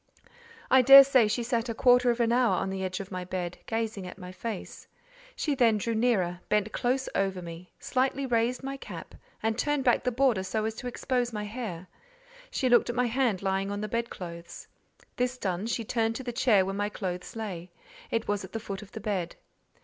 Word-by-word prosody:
I 260 Hz, 0 st, +7 dB
daresay 270 Hz, -2 st, +8 dB
she 235 Hz, +3 st, -1 dB
sat 235 Hz, 0 st, -1 dB
a 230 Hz, -, -3 dB
quarter 245 Hz, +1 st, +5 dB
of 240 Hz, 0 st, +1 dB
an 230 Hz, -1 st, +2 dB
hour 245 Hz, 0 st, +3 dB
on 190 Hz, -, -2 dB
the 190 Hz, 0 st, -3 dB
edge 185 Hz, 0 st, -3 dB
of 195 Hz, -1 st, -7 dB
my 185 Hz, -1 st, -4 dB
bed, 180 Hz, -1 st, -4 dB
gazing 225 Hz, -4 st, -2 dB
at 180 Hz, -, -9 dB
my 180 Hz, -1 st, -9 dB
face. 210 Hz, +2 st, -7 dB, 0.5 s
She 300 Hz, -, -1 dB
then 235 Hz, -5 st, +3 dB
drew 230 Hz, +3 st, -2 dB
nearer, 210 Hz, -7 st, +1 dB
bent 210 Hz, 0 st, +1 dB
close 260 Hz, +4 st, 0 dB
over 195 Hz, -1 st, 0 dB
me; 170 Hz, 0 st, -9 dB
slightly 270 Hz, +1 st, 0 dB
raised 245 Hz, +1 st, 0 dB
my 275 Hz, 0 st, -4 dB
cap, -, -, -9 dB, 0.3 s
and 225 Hz, 0 st, +1 dB
turned 295 Hz, -1 st, +1 dB
back 245 Hz, -2 st, +3 dB
the 250 Hz, -, +1 dB
border 250 Hz, -5 st, +2 dB
so 215 Hz, +3 st, -2 dB
as 220 Hz, -, -1 dB
to 250 Hz, -, -5 dB
expose 245 Hz, 0 st, -1 dB
my 210 Hz, -2 st, -4 dB
hair; 210 Hz, -5 st, -5 dB, 0.6 s
she 260 Hz, -, 0 dB
looked 240 Hz, -1 st, +4 dB
at 240 Hz, -, -2 dB
my 250 Hz, 0 st, +2 dB
hand 235 Hz, -5 st, 0 dB
lying 195 Hz, 0 st, 0 dB
on 205 Hz, 0 st, -3 dB
the 215 Hz, -, -2 dB
bedclothes. 175 Hz, -7 st, -5 dB, 0.5 s
This 250 Hz, +1 st, 0 dB
done, 190 Hz, -1 st, -2 dB
she 230 Hz, 0 st, -1 dB
turned 225 Hz, 0 st, 0 dB
to 265 Hz, -, -5 dB
the 245 Hz, -1 st, -4 dB
chair 220 Hz, -6 st, +4 dB
where 195 Hz, -, -3 dB
my 205 Hz, +1 st, -1 dB
clothes 180 Hz, -2 st, -5 dB
lay: 185 Hz, -6 st, -5 dB, 0.4 s
it 230 Hz, 0 st, -1 dB
was 205 Hz, -1 st, -1 dB
at 190 Hz, -, -10 dB
the 225 Hz, -, -2 dB
foot 195 Hz, -2 st, -6 dB
of 210 Hz, -, -14 dB
the -, -, -6 dB
bed. 190 Hz, -5 st, -2 dB
225 Hz, 210 wpm, -28 LUFS, 190-245 Hz, 0.6 s, daresay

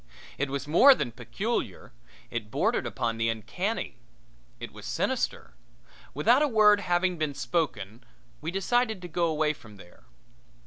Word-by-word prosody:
It 140 Hz, 0 st, 0 dB
was 140 Hz, +1 st, -4 dB
more 260 Hz, -, +7 dB
than 120 Hz, -, -3 dB
peculiar 125 Hz, -, -4 dB, 0.4 s
it 110 Hz, -3 st, -4 dB
bordered -, -, 0 dB
upon 115 Hz, -1 st, -2 dB
the 115 Hz, 0 st, +1 dB
uncanny. 110 Hz, -2 st, -3 dB, 0.6 s
It -, -, -7 dB
was -, -, -10 dB
sinister. -, -, -2 dB, 0.6 s
Without 235 Hz, -, +4 dB
a 300 Hz, -, +4 dB
word 210 Hz, -4 st, +5 dB
having 180 Hz, -2 st, 0 dB
been 150 Hz, -2 st, -1 dB
spoken 120 Hz, -, -2 dB, 0.4 s
we 160 Hz, -, -3 dB
decided 220 Hz, +2 st, 0 dB
to -, -, -5 dB
go 170 Hz, +1 st, 0 dB
away 155 Hz, -1 st, +1 dB
from 110 Hz, -8 st, -15 dB
there. 85 Hz, -2 st, -17 dB
155 Hz, 145 wpm, -28 LUFS, 120-195 Hz, 0.6 s, more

